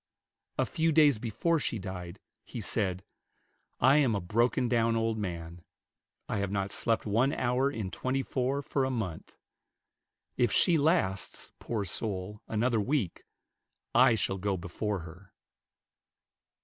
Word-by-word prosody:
A - - +2
few 165 0 +1
days 145 -6 +5
before 140 +9 0
she 120 - -2
died, 95 -2 -7 0.3
he 120 - -7
said, 95 -3 -1 0.8
"I 135 +3 +6
am 130 -7 +3
a - - 0
broken 115 +7 +1
down 115 -1 +2
old 115 0 +1
man. 85 -4 -5 0.7
I - - -2
have 100 -1 -1
not 100 0 -2
slept 115 +1 0
one 115 +6 +2
hour 130 0 +1
in 110 -9 -4
twenty 130 +1 -1
four 135 +3 -1
for 135 0 0
a 130 - 0
month. 110 -11 -4 1.0
If 120 - +3
she 175 - +5
lasts, 145 - 0
poor 110 -4 -3
soul, 100 +2 -2
another 115 +1 +1
week, 125 - -1 0.7
I 115 - +6
shall 95 -2 -1
go 100 0 -1
before 90 +3 -3
her." 90 +4 -13
110 Hz, 140 wpm, -30 LUFS, 95-130 Hz, 1.0 s, I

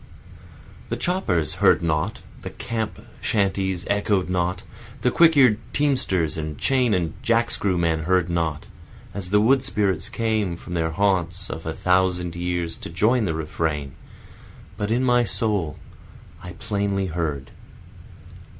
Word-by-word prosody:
The - - -2
choppers 100 - 0
heard - - +5
not, 85 +5 -1 0.2
the - - -6
camp 110 -1 -4 0.2
shanties 95 -4 0
echoed 100 -2 +1
not, 90 0 -1 0.4
The 125 - +2
quick 165 +1 +5
ear'd 125 -6 +5
teamsters 95 - +1
and 75 -2 -5
chain 125 - +2
and 85 -3 -1
jack 115 0 +2
screw 95 -3 0
men 80 -2 0
heard 90 -1 +2
not, 85 -4 -1 0.5
As 95 -3 -4
the 105 +2 +4
wood 130 +5 +4
spirits 100 +1 0
came 110 -6 -1
from 90 - -9
their 80 -2 0
haunts 95 0 0
of 80 0 -6
a 80 - -2
thousand 90 -2 +1
years 85 -1 -2
to - - -8
join 110 +8 +2
the 80 -4 -1
refrain, 75 -3 -2 0.8
But 105 0 -3
in 120 +3 +1
my 120 -1 +4
soul 100 -7 0 0.7
I - - -8
plainly 100 -1 -1
heard. 80 -6 -3
95 Hz, 140 wpm, -23 LUFS, 85-110 Hz, 0.8 s, heard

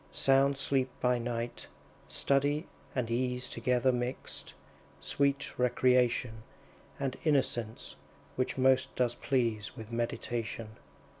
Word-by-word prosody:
Sound 135 +1 +3
sleep 135 -1 +1
by 125 -1 +2
night; 120 0 -4 0.4
study 145 +3 +1 0.3
and 120 -3 -1
ease 125 +1 0
Together 125 +2 +2
mixed; 125 0 -4 0.4
sweet 140 -2 0
recreation, 125 -2 +2 0.6
And 135 -2 -2
innocence, 125 -7 0 0.4
which 130 +1 -1
most 130 0 +3
does 125 -2 +1
please 120 -5 -1
With 110 0 -8
meditation. 115 -1 -3
125 Hz, 100 wpm, -31 LUFS, 120-135 Hz, 0.6 s, Sound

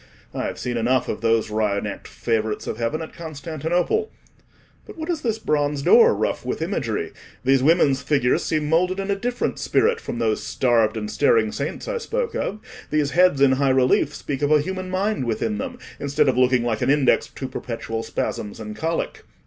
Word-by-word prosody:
I - - -2
have - - -4
seen 120 -1 -3
enough 120 +2 +1
of - - -4
those 115 -1 +1
wry 105 -2 +1
necked - - -6
favourites 110 -2 -2
of - - -4
heaven 135 +8 -1
at 160 - -10
Constantinople. 165 - -2 0.8
But - - -11
what 320 +2 -3
is 320 -3 -2
this 225 -3 -1
bronze 145 -7 0
door 470 - +6
rough - - -1
with - - -3
imagery? - - -2 0.3
These 135 0 +4
women's 140 -2 +3
figures 135 -4 +2
seem 155 -2 0
moulded 180 +4 +2
in 195 +1 -2
a - - +2
different 245 +5 -2
spirit 465 0 +2
from - - -5
those 110 -2 0
starved 115 -3 +2
and 105 -1 -4
staring 115 -6 +3
saints 140 +5 -4
I - - -2
spoke 470 +1 -2
of: 210 - -3 0.3
these 150 -2 +1
heads 175 -5 +4
in 140 -1 +6
high 135 +1 +2
relief 130 +2 +3
speak 140 -1 -4
of 145 +1 +1
a 155 - +6
human 185 +3 -4
mind 190 -4 -1
within 165 - -1
them, 255 -2 -5 0.2
instead 140 -1 +1
of 130 - +3
looking 125 -1 +3
like 115 -2 -1
an - - +1
index 140 -2 +3
to 130 - -7
perpetual 115 -3 -4
spasms 105 -2 -4
and 105 -1 -7
colic." 165 +7 -2
145 Hz, 195 wpm, -23 LUFS, 120-185 Hz, 0.8 s, door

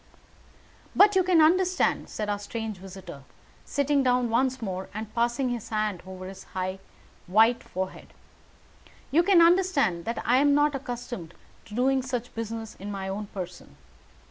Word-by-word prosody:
"But 410 0 +6
you 380 - +5
can 355 -3 +4
understand," 365 +3 +2
said 210 - -4
our 205 0 -1
strange 220 0 -5
visitor, 185 -5 -10 0.4
sitting 285 0 +1
down 250 -2 +2
once 260 +2 +1
more 190 -4 -4
and 215 0 -6
passing 240 +2 +1
his 240 -3 -4
hand 215 -4 -1
over 185 0 -8
his 190 0 -9
high, 185 +1 -2 0.5
white 225 +6 +4
forehead, 185 +1 -6 1.0
"you 315 +5 +5
can 350 -2 +6
understand 335 - +3
that 230 +1 -3
I 245 +3 +4
am 285 +1 +4
not 295 0 +3
accustomed 240 - -6 0.3
to 210 - -10
doing 265 +2 +2
such 250 -2 -4
business 225 -1 -5
in 200 +2 -7
my 195 -1 -4
own 205 +2 -4
person. 180 -3 -8
230 Hz, 155 wpm, -27 LUFS, 195-275 Hz, 1.0 s, But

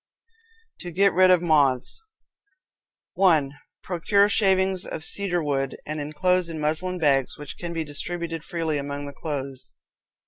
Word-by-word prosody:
To 175 - -7
Get 195 +3 +3
Rid 185 +2 +5
of 180 -1 +4
Moths 145 - +2 1.1
1. 160 -8 +3 0.3
Procure 200 +3 +2
shavings 190 -3 +2
of 160 - -6
cedar 180 -4 0
wood, 135 -2 -2
and 155 +1 -4
inclose 170 +4 0
in 160 -1 -5
muslin 160 +5 -1
bags, 140 -5 +1
which 145 -1 -8
can 175 -1 -4
be 165 -1 -2
distributed 165 +2 -3
freely 165 -4 -2
among 140 0 -5
the 140 - -8
clothes. 140 -3 -6
165 Hz, 140 wpm, -24 LUFS, 145-180 Hz, 1.1 s, Rid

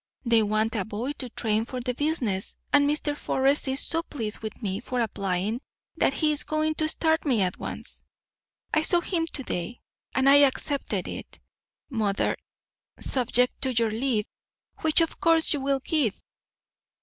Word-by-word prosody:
They 230 -1 +4
want 215 +1 +1
a 205 - 0
boy 220 +7 -4
to 255 - -5
train 220 -1 0
for 250 +2 -5
the 250 0 -2
business, 245 -9 -1 0.2
and 285 0 +5
Mr. 295 0 0
Forrest 275 0 +1
is 265 +1 +2
so 330 0 +2
pleased 225 -10 -4
with 220 -1 -7
me 195 -3 -2
for 250 +1 -3
applying 200 0 -1 0.3
that - - +2
he 305 +2 +2
is 295 - 0
going 310 0 0
to 310 - +2
start 320 0 +2
me 245 -9 +2
at 180 0 -2
once. - - -5 0.7
I 305 - +4
saw 345 +2 +3
him 335 -2 -1
to 280 - -4
day, 205 +1 -4 0.4
and 265 0 +3
I 280 +1 +8
accepted 285 0 +1
it, - - -7 0.5
mother, 215 -7 0 0.6
subject 250 -1 +2
to 260 -2 +1
your 225 -1 +2
leave, 225 -2 0 0.5
which, 315 +1 +3
of 330 - -1
course, 330 -1 +4
you 290 - -2
will 275 0 0
give. 265 -9 0
260 Hz, 170 wpm, -26 LUFS, 220-295 Hz, 0.7 s, I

